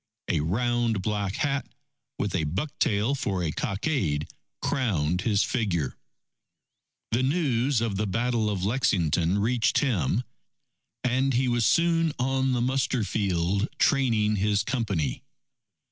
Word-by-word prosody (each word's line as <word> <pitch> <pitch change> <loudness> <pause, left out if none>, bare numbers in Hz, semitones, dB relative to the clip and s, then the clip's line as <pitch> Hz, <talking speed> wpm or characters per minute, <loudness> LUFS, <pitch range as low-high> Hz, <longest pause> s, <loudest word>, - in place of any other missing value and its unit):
A 85 - +1
round 115 +5 0
black 105 -2 -1
hat, 140 -1 -1 0.5
with 100 - -2
a 85 -4 0
buck 95 - -2
tail 105 +6 +2
for 100 -10 -1
a 80 - -1
cockade, 95 - -1 0.3
crowned 90 - 0
his 105 -3 +2
figure. 85 - -1 1.2
The 115 +3 +2
news 135 -4 +1
of 110 -4 -1
the 105 +1 0
Battle 115 +1 0
of 95 -3 -2
Lexington 90 - +1
reached 115 +3 +1
him, 110 - +1 0.8
and 130 +1 +1
he 130 +1 +2
was 120 -2 +2
soon 165 -2 +2
on 130 +1 +1
the 120 - 0
muster 130 -1 0
field 100 0 0
training 115 -8 +2
his 100 0 +1
Company. 100 - -1
110 Hz, 130 wpm, -26 LUFS, 95-130 Hz, 1.2 s, tail